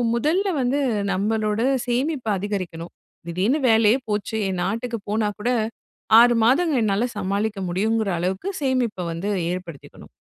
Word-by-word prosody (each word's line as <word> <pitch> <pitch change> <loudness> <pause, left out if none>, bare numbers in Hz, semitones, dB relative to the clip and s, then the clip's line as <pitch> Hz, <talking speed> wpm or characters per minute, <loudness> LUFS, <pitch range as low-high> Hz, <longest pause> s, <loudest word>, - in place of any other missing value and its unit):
முதல்ல 325 - +1
வந்து 260 +3 +1 0.3
நம்மளோட 210 +2 0 0.3
சேமிப்ப 255 +1 -1
அதிகரிக்கணும். 185 -4 -5 0.3
திடீர்னு 190 - +1
வேலையே 220 +1 +5
போச்சு! 210 +1 -2
என் 185 -2 -2
நாட்டுக்கு 230 +4 -2
போனாக்கூட, 210 +1 -1 0.7
6 240 +1 +6
மாதங்கள் 275 +1 +3
என்னால 210 +2 +1
சமாளிக்க 200 +2 -1
முடியுங்குற 215 +3 0
அளவுக்கு 190 - -2
சேமிப்ப 255 -5 0 0.2
வந்து 175 +5 -3 0.2
ஏற்படுத்திக்கணும். 180 -5 -8
215 Hz, 115 wpm, -23 LUFS, 195-245 Hz, 0.7 s, 6